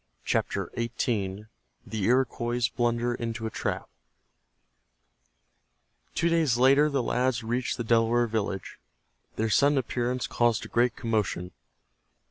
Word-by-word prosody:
CHAPTER - - -1
XVIII—THE 105 - -4
IROQUOIS 120 -2 +1
BLUNDER 120 0 0
INTO 115 -1 -4
A 110 - -3
TRAP - - -3 2.3
Two 170 - +2
days 160 -8 +2
later 135 +4 +5
the 140 -3 0
lads 125 -1 0
reached 120 +3 -1
the 120 - -2
Delaware 115 +1 +3
village. 105 -4 -3 0.6
Their 110 0 -1
sudden 140 +5 +4
appearance 125 0 -1
caused 120 -2 +1
a - - -10
great 120 +1 +2
commotion. 105 -6 -1
120 Hz, 110 wpm, -27 LUFS, 110-125 Hz, 2.3 s, later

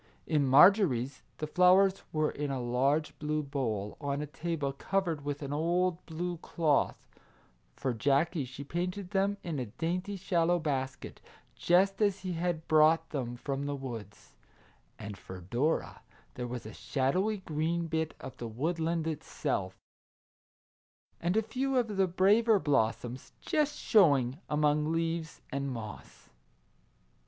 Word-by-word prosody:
In 150 -3 +2
Marjorie's 135 - +5 0.2
the 155 - -3
flowers 185 +4 +4
were 155 -1 +1
in 145 0 -3
a 135 -1 -2
large 135 +6 +1
blue 150 0 -1
bowl, 115 -8 -3
on 140 -1 -1
a 150 - -2
table 150 -2 -3
covered 165 0 -1
with 145 0 -4
an 140 0 -4
old 175 +3 +1
blue 175 +2 -3
cloth; 160 -2 +1 0.8
for 130 -2 -1
Jackie 140 +6 +1
she 135 +2 -8
painted 180 +5 -3
them 200 0 +1
in 165 -5 -3
a 125 - -3
dainty 180 - -3
shallow 175 -2 +1
basket, 135 -5 -3 0.3
just 195 +3 +3
as 200 -2 +2
he 185 -2 -3
had 165 -1 -2
brought 160 +1 +4
them 120 -4 -3
from 140 +2 -3
the 145 - -2
woods; 115 -7 -8 0.6
and 100 -2 -8
for 95 0 -9
Dora 120 - -1 0.3
there 125 0 -4
was 120 -2 -6
a 110 - -8
shadowy 180 - 0
green 165 -1 -1
bit 160 -1 -2
of - - -8
the 120 - -5
woodland 160 +7 -1
itself, 140 -10 -3 1.4
and 175 +4 0
a 220 - +3
few 265 +4 -1
of 225 -4 0
the 190 -1 +3
braver 205 +5 +4
blossoms 125 - -1
just 300 -1 0
showing 140 - +4
among 150 +1 +2
leaves 165 -1 -2
and 140 0 -2
moss. 110 -3 -9
155 Hz, 140 wpm, -31 LUFS, 135-180 Hz, 1.4 s, Marjorie's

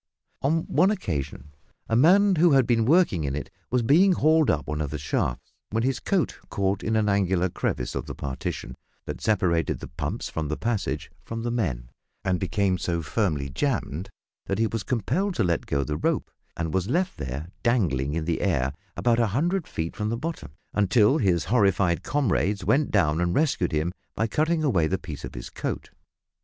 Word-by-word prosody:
On 160 +4 +1
one 180 +6 +3
occasion 75 - -3 0.4
a 115 - 0
man 185 - +5
who 165 -1 +5
had 135 -2 +5
been 115 -2 +2
working 150 - +3
in 70 -1 -2
it 75 - -5 0.2
was 125 -1 +1
being 175 - +5
hauled 155 -2 +3
up 75 - +1
one 75 0 -3
of 75 - -2
the 75 - -4
shafts, 65 -3 -2 0.2
when 115 +2 0
his 130 -2 0
coat 190 -4 0
caught 100 0 0
in 110 - -1
an 110 -1 +2
angular 95 -2 +2
crevice 65 -6 -2
of - - -4
the - - -6
partition, 65 -2 -5 0.3
that - - -6
separated 90 -6 +1
the - - -8
pumps - - -4
from 80 -2 -3
the 75 - -2
passage 100 - -2
for 115 - -7
the 115 +1 -2
men, 65 - -2 0.3
and 95 -2 +1
became 95 -1 0
so 85 -1 -1
firmly 75 -4 0
jammed 95 - -2 0.4
that 100 - -1
he 115 - +2
was 115 0 -2
compelled 165 - -1
to - - +2
let 85 -3 0
go 70 0 0
the 75 +1 -3
rope, - - -1 0.3
and 80 -2 -2
was 95 +2 0
left 180 - 0
there 70 +4 -5
dangling 75 - +1
in 80 -1 -2
the 85 -1 -1
air, 65 +2 +1 0.2
about 120 -1 +2
a 115 - +3
hundred 175 +4 0
feet 80 +1 -4
from 105 0 -2
the 115 - -1
bottom, 160 - -5 0.2
until 105 - +4
his 90 -7 +2
horrified 95 -4 +2
comrades 105 -8 0
went 135 +9 +3
down 80 -5 +2
and 85 0 0
rescued 140 - +1
him 80 +3 0 0.2
by 110 - +1
cutting 155 +7 +1
away 95 - +2
the 95 - 0
piece 80 -7 -8
of - - -7
his - - -7
coat. - - -4
100 Hz, 195 wpm, -26 LUFS, 80-125 Hz, 0.4 s, man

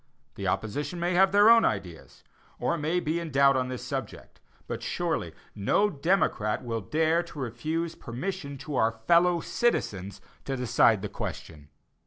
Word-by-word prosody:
The - - -5
opposition 145 - -2
may 175 +1 0
have 190 +2 +5
their 205 +2 +6
own 230 0 +7
ideas, 80 -9 -3 0.3
or - - 0
may 165 +2 0
be 165 0 -1
in 170 -1 -5
doubt 140 -1 +4
upon 130 -1 0
this 125 -1 -6
subject; - - -6 0.2
but - - -5
surely - - -2 0.2
no 200 - +1
true 145 - -13
democrat 150 - +1
will 115 -2 -3
dare 160 - +1
to 170 - -12
refuse 155 +7 -3
permission 140 +3 -5
to 145 -4 -3
our 115 -1 +2
fellow 170 0 +4
citizens 100 - -1 0.3
to 135 -1 -2
decide 115 -4 +3
the - - -1
question. 75 -6 -7
145 Hz, 165 wpm, -27 LUFS, 115-170 Hz, 0.3 s, own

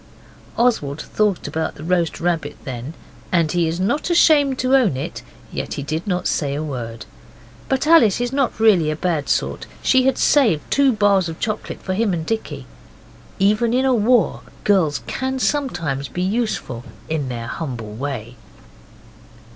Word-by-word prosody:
Oswald 190 - +1
thought 210 -4 -1
about 160 0 -3
the 150 - -10
roast 170 -1 0
rabbit 165 -4 -1
then 130 +4 -6 0.4
and 165 -3 +2
he 175 -2 +1
is 165 +2 -2
not 280 - 0
ashamed 295 -6 +4
to 255 +1 +2
own 225 - +3
it 135 - -5 0.3
yet - - -4
he 140 - -4
did 155 +6 -4
not 180 -2 -1
say 140 -2 0
a 150 - -2
word. 115 -6 -6 0.6
But 265 +2 +1
Alice 300 - +5
is 245 +1 -2 0.2
really 210 -8 +4
not 155 - +1
a 155 - -9
bad 165 -6 -1
sort. - - -1 0.2
She 260 -1 +4
had 265 - +2
saved 225 - +3
two 280 -1 +4
bars 200 -5 +2
of 160 - -8
chocolate 215 -2 -4
for 185 - -2
him 205 0 +1
and 160 -1 -4
Dicky. 225 +3 -4 0.7
Even 210 +4 +2
in 255 -4 +2
war 245 -2 +3 0.2
girls 180 -8 +2
can 265 0 -3
sometimes 175 - -1
be 180 - -3
useful 195 - -2 0.2
in 150 -4 -2
their 120 -2 -4
humble 120 -6 -5
way. 125 -1 -5
180 Hz, 165 wpm, -20 LUFS, 145-235 Hz, 0.7 s, Alice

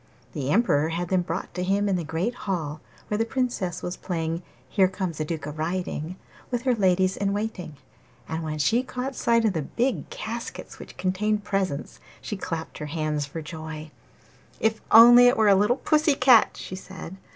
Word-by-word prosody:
The 135 -2 -3
Emperor 160 -6 +3
had 170 +1 -3
them 185 -1 +2
brought 175 +1 -4
to 180 - -3
him 200 +2 +1
in 195 - +1
the 175 - -1
great 165 +9 -2
hall, 160 -9 -4 0.3
where 210 - -1
the - - +3
Princess 235 -7 -2
was 180 - -3
playing 165 -1 -3 0.3
'Here 190 +7 +3
comes 185 -4 -4
a - - +1
duke 160 -1 -4
a 150 - -4
riding' 165 +1 -3 0.3
with 245 -1 -2
her 255 -2 +3
ladies 190 -3 +2
in 200 0 -1
waiting. 200 -8 -4 0.5
And 160 0 -3
when 155 -1 -4
she 220 - +2
caught 260 +1 -4
sight 230 -1 +2
of 210 - +2
the 160 - -1
big 240 - -1
caskets 235 +2 -6
which - - -11
contained 205 +3 0
the - - -16
presents, 190 -8 -2 0.2
she 210 - -5
clapped 165 -4 -5
her 150 - -5
hands 150 -2 -2
for 160 +3 -6
joy. 155 0 -7 0.7
'If 220 0 +1
only 240 +2 +9
it 245 - +4
were 220 -2 +4
a - - +7
little 210 +6 +3
pussy 305 -1 +2
cat!' 255 -4 +5
she 185 - -7
said. 190 -1 -9
185 Hz, 195 wpm, -25 LUFS, 160-220 Hz, 0.7 s, only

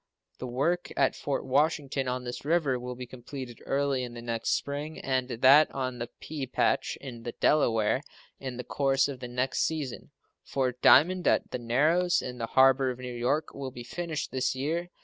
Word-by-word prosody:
The 130 - -5
work 145 +9 -1
at - - +3
Fort 140 - -3
Washington, 140 -1 +1
on 125 0 -2
this 120 0 -6
river, 145 -4 +1
will 125 0 -6
be 125 +1 -7
completed 125 0 -9
early 140 -1 +1
in 120 -1 -7
the 120 - -7
next 115 -1 -2
spring, 145 +2 -2
and 130 -1 -1
that 130 +5 +6
on 130 -2 -3
the 120 0 -4
Pea 145 -4 -5
Patch, - - 0
in 125 -4 -8
the 120 0 -6
Delaware, 115 -5 +2 0.4
in 130 -2 -6
the 125 - -4
course 135 0 +1
of 140 -3 -6
the 125 - -6
next 125 +2 -1
season. 150 -6 -2 0.3
Fort 125 -2 -2
Diamond, 180 +4 +6
at - - +2
the 125 - -3
Narrows, 155 +10 +2
in 125 0 -6
the 115 - -2
harbor 130 +1 +4
of 125 - -4
New 125 -1 -6
York, 130 +6 -1
will 135 -1 -5
be 120 -1 -9
finished 160 +4 -4
this 130 0 0
year. 165 +6 -2
130 Hz, 190 wpm, -28 LUFS, 125-145 Hz, 0.4 s, that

